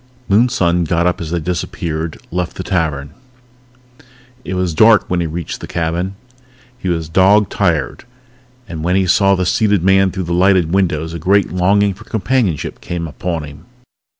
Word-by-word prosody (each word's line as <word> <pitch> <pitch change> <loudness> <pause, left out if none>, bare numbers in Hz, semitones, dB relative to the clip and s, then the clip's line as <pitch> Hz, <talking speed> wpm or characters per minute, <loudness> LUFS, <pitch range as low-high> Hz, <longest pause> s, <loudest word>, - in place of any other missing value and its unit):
Moonson 100 -5 +2
got 85 +2 0
up 90 -1 0
as 80 - -5
they 85 +1 -1
disappeared, 80 -1 -4
left 90 0 -3
the 95 - -5
tavern. 80 -7 -2 1.3
It 95 - -4
was 90 -2 -1
dark 110 +6 +5
when 90 - -1
he 85 - -1
reached 80 +1 -5
the - - -7
cabin. 85 +3 -2 0.6
He 95 - -5
was 80 -2 -1
dog 95 +5 +4
tired, 85 -8 -1 0.6
and 80 -2 -6
when 90 +2 +1
he 95 -1 +2
saw 100 +2 +3
the 90 -1 -1
seated 100 0 +1
man 95 0 +4
through 95 0 -4
the 85 0 -3
lighted 90 -2 +3
window 85 -5 +1
a 85 +1 -6
great 100 +5 +2
longing 100 +3 +2
for 105 +4 -15
companionship 110 - -1
came 85 -1 -4
upon 85 +1 -4
him. 75 +2 -11
90 Hz, 170 wpm, -17 LUFS, 85-95 Hz, 1.3 s, dark